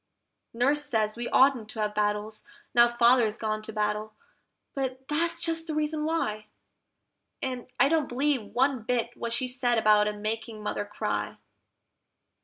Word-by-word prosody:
Nurse 275 +5 +1
says 220 -6 0
we 240 +1 -4
oughtn't 260 -5 +4
to 220 - -7
have 210 0 -1
battles, 210 +1 -1 0.3
now 240 0 +7
Father's 235 -2 +3
gone 215 -1 -2
to 215 - -7
battle, 210 0 -2 0.6
but 265 -1 -4
that's 335 +3 0
just 330 0 -1
the 310 - -3
reason 305 0 -1
why! 215 -10 -1 0.9
And 255 -2 -4
I 275 - +6
don't 310 -1 +1
believe 270 +1 +1
one 265 0 +2
bit 235 +1 -1
what 235 - -4
she 235 +2 -1
said 250 -1 0
about 210 -1 +4
its 210 0 -3
making 220 +1 -4
Mother 205 - -2
cry. 205 - -3
240 Hz, 155 wpm, -27 LUFS, 215-270 Hz, 0.9 s, now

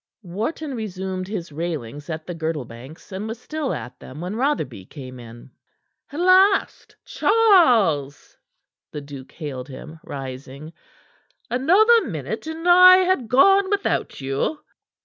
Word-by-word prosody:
Wharton 230 - -4
resumed 190 -4 -5
his 185 -6 -6
railings 145 -3 -5
at 160 -1 -5
the 175 - -6
Girdlebanks, 150 - -7
and 195 +3 -5
was 225 +1 -6
still 305 +1 -4
at 120 +2 -7
them 130 +4 -11
when 180 +5 -5
Rotherby 230 - -2
came 130 -4 -10
in. 120 +2 -13 0.6
"At 290 - -6
last, 375 +2 +3
Charles!" 235 - +2 0.6
the 150 - -6
duke 140 -2 -11
hailed 135 -6 -7
him, 155 +4 -10
rising. 135 +3 -8 0.8
"Another 390 - +4
minute, 170 - -5
and 325 +2 -5
I 365 +1 +9
had 355 -11 0
gone 390 - +5
without 405 -1 -1
you." 135 - -2
180 Hz, 130 wpm, -22 LUFS, -, 0.8 s, I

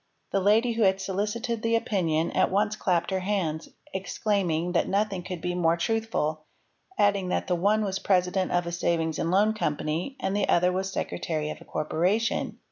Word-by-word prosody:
'' - - -46
The 195 - +2
lady 215 +5 +3
who 230 - -2
had 190 -2 +4
solicited 210 +5 -2
the 230 0 +1
opinion 170 -8 0
at - - +2
once 205 +2 +1
clapped 175 -1 0
her 190 - +1
hands, 185 -5 -2 0.2
exclaiming 190 -3 -1
that 175 - +1
nothing 200 -2 0
could 180 -2 -6
be 180 +1 -2
more 170 -1 +2
truthful, 170 -7 -1 0.5
adding 200 -3 +2
that - - 0
the 180 - 0
one 205 +5 +2
was 195 -1 -2
president 185 -1 +1
of 175 0 +1
a 170 - -3
savings 165 -2 0
and 165 - 0
loan 205 +4 +3
company 160 - -2
and 190 +1 -1
the 205 - 0
other 180 +1 +4
was 190 +1 -2
secretary 155 -5 -3
of - - -9
a - - -13
corporation. 185 +9 0
190 Hz, 190 wpm, -27 LUFS, 170-205 Hz, 0.5 s, had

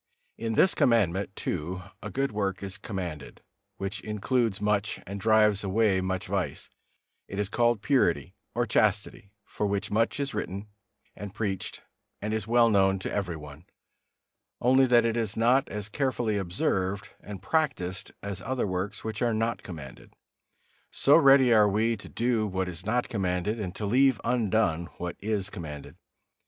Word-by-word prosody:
In 115 0 -3
this 185 - +4
Commandment 100 -5 +2
too 90 +2 -3 0.2
a - - -5
good 135 0 -1
work 100 -3 -2
is 95 -1 -5
commanded, 90 -8 -6 0.3
which 95 +1 -4
includes 110 0 0
much 105 0 0
and 100 +2 -6
drives 105 -1 +4
away 100 -1 +2
much 95 0 -2
vice; - - -3 0.6
it 95 - -7
is 105 -1 -1
called 120 -2 +1
purity, 95 - +2 0.2
or 120 0 +1
chastity, 105 -2 0 0.3
of 105 - +1
which 100 0 -2
much 115 +6 +1
is 140 -1 -2
written 100 +3 -4 0.5
and 105 0 -8
preached, 100 -4 -3 0.4
and 105 +2 -3
it - - +2
is 110 -1 -6
well 120 0 +5
known 95 -3 +3
to 95 - -5
every 95 -4 -2
one, 75 +1 -11 0.9
only 130 +2 +4
that 120 -1 +5
it 115 -1 +1
is 110 -3 -2
not 125 +4 +3
as 105 -1 -4
carefully 120 -3 -1
observed 95 +2 -1
and 100 -2 -9
practised 110 - -1
as 100 -2 -4
other 130 +3 -1
works 95 +3 -3
which 110 -1 -4
are 120 -2 +2
not 115 +1 -1
commanded. 75 -8 -10 0.7
So 140 - +4
ready 135 -5 +6
are 105 -2 +6
we 110 +3 +1
to 100 - -11
do 115 -2 0
what 95 -1 -2
is 90 +3 -7
not 120 +3 +1
commanded 100 -1 -1
and 95 -4 -4
to 105 - -4
leave 130 +3 +4
undone 110 -8 +1
what 90 0 -4
is 105 -2 -2
commanded. 75 -7 -8
105 Hz, 165 wpm, -28 LUFS, 95-115 Hz, 0.9 s, ready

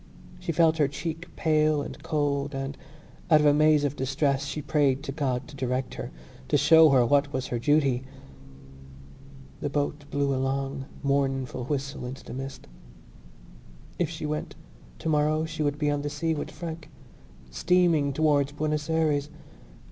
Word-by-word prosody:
She - - -3
felt 160 0 +3
her 145 - +4
cheek 165 +4 -5
pale 155 -2 +2
and - - -8
cold 145 -2 -1
and, 135 +1 -4 0.5
out 155 -2 +7
of 150 - +2
a 145 - +6
maze 155 0 +4
of 145 -1 -1
distress, 135 +1 0
she 140 +2 -4
prayed 140 -2 +1
to 140 - -4
God 135 -4 -2
to 150 - -12
direct 130 -1 -2
her, 120 - -6 0.4
to 145 - +3
show 160 +2 +7
her 130 -3 +5
what 140 +3 +2
was 130 -1 -2
her 120 - -2
duty. 140 -1 +2 1.6
The 145 - -2
boat 145 +1 -2
blew 140 -1 0
a 130 - -1
long 135 0 -2 0.2
mournful 135 -3 0
whistle 140 -2 -3
into 130 +2 -8
the - - -9
mist. 135 +1 -7 1.3
If 175 -4 +1
she 160 -2 -6
went, 150 0 -4 0.4
tomorrow 155 0 +1
she 155 -1 -5
would 145 -1 0
be 150 -1 +1
on 145 0 -1
the 145 - -3
sea 160 +3 -1
with 150 - -4
Frank, 165 -2 -7 0.6
steaming 165 - +2
towards 145 -1 +2
Buenos 150 +1 -2
Ayres. 150 -3 +1
145 Hz, 165 wpm, -27 LUFS, 135-155 Hz, 1.6 s, out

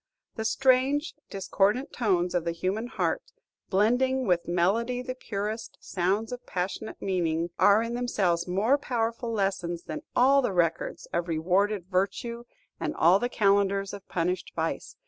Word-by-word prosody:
The 220 - -3
strange, 265 +5 +2 0.2
discordant 205 +6 0
tones 180 -7 +1
of 175 -2 +1
the 170 0 -1
human 195 +7 -2
heart, - - -1 0.5
blending, 245 +6 +2
with 175 -3 +1
melody 225 +9 +1
the 255 0 -4
purest, 215 -2 -5
sounds 200 +6 -1
of 250 0 -6
passionate 185 +4 -4
meaning, 170 -3 -1
are 205 +2 +6
in 230 +1 -4
themselves 190 -8 0
more 215 +10 +2
powerful 230 -2 -2
lessons 190 -5 -1
than 305 - -6
all 275 +3 +5
the 245 - -1
records 170 -2 0
of 170 0 0
rewarded 180 +4 +1
virtue 200 +6 -2 0.3
and - - -2
all 175 +4 +5
the 245 - -1
calendars 200 -2 +2
of 200 -1 -9
punished 180 +1 -2
vice. 165 0 -3
200 Hz, 145 wpm, -27 LUFS, 180-240 Hz, 0.5 s, are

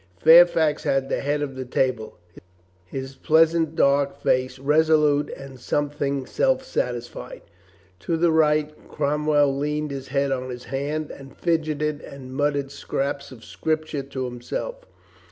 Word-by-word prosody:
Fairfax 165 - +6
had 135 0 0
the - - 0
head 145 +1 -1
of 135 -2 -5
the 130 - -4
table, 125 -3 -1 0.7
his 135 +3 -6
pleasant 160 +1 +3
dark 140 0 +2
face 130 -1 0
resolute 150 +1 +3
and 135 -1 -11
something 140 0 -1
self 265 - +1
satisfied. 120 - -4 0.6
To 165 - -1
the 170 0 +3
right 155 -1 +1
Cromwell 145 -1 +1
leaned 150 +1 -2
his 135 -1 -6
head 140 0 0
on 130 -1 -2
his 125 -1 -7
hand 145 +3 -3
and 135 -1 -12
fidgeted 155 -2 -1
and 130 -2 -10
mut 145 +1 +1
tered 140 -1 -3
scraps 140 0 -3
of 115 -3 -12
Scripture 155 -2 -2
to 135 -1 -5
himself. 305 - -5
145 Hz, 140 wpm, -24 LUFS, 135-155 Hz, 0.7 s, Fairfax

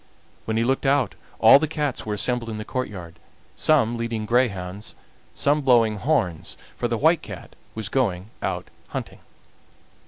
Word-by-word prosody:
When 110 0 -1
he 115 - +2
looked 135 +3 0
out 135 -4 +2 0.2
all 140 - +8
the 155 - 0
cats 150 -6 -3
were 105 - -1
assembled 120 +2 0
in 110 - -4
the 105 - -6
courtyard, 95 -10 -5 0.4
some 120 - +3
leading 115 -2 -3
greyhounds, 105 -4 -1 0.4
some 145 +2 +2
blowing 115 -5 +4
horns, 110 - -1 0.2
for - - -1
the - - -1
White - - +3
Cat - - -10 0.2
was 110 -2 -3
going 105 -6 -1
out - - -3 0.2
hunting. - - -6
115 Hz, 155 wpm, -24 LUFS, 105-135 Hz, 0.4 s, all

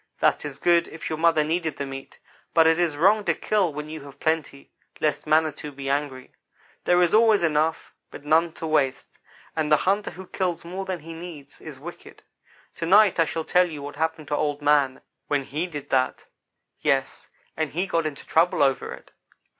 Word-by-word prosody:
"That - - +2
is 140 -2 -6
good, 170 +1 +3
if 160 0 -7
your 155 - -3
mother 165 -2 +4
needed 160 -1 -2
the 140 - -3
meat, 135 0 -9 0.4
but 165 - +6
it 160 +1 +4
is 165 -4 +1
wrong 205 +6 +4
to - - +2
kill 205 -6 +1
when 150 +1 -6
you 155 0 -7
have 140 0 -13
plenty, 155 -3 -2 0.3
lest 150 0 -1
Manitou 155 -1 +1
be 135 0 -4
angry. 140 -2 -3 0.5
There 175 0 +4
is 170 - +1
always 220 -3 +5
enough, 160 0 0 0.2
but 145 - -11
none 160 +3 +3
to 165 - -7
waste, 145 -4 -1 0.4
and 155 -1 -1
the 150 - +7
hunter 200 +2 +1
who 190 +1 -10
kills 180 -2 -3
more 185 +3 -5
than 185 -4 -4
he 165 +2 -9
needs 165 -4 -10
is - - -10
wicked. - - -11 0.5
To 165 - -3
night 200 0 +5
I 165 - +5
shall 160 0 -4
tell 180 0 +3
you 150 -3 -7
what 145 0 -7
happened 160 -1 -2
to 145 - +1
Old 145 -1 -1
man 145 -3 +3 0.3
when 145 -1 0
he 150 +7 -3
did 145 -5 -8
that. 130 -1 +1 0.6
Yes, - - -1 0.3
and 160 -1 -1
he 175 +6 -1
got 165 -4 0
into 145 -3 -8
trouble 165 -2 +3
over 135 -1 +1
it. - - -20
160 Hz, 200 wpm, -25 LUFS, 145-170 Hz, 0.6 s, the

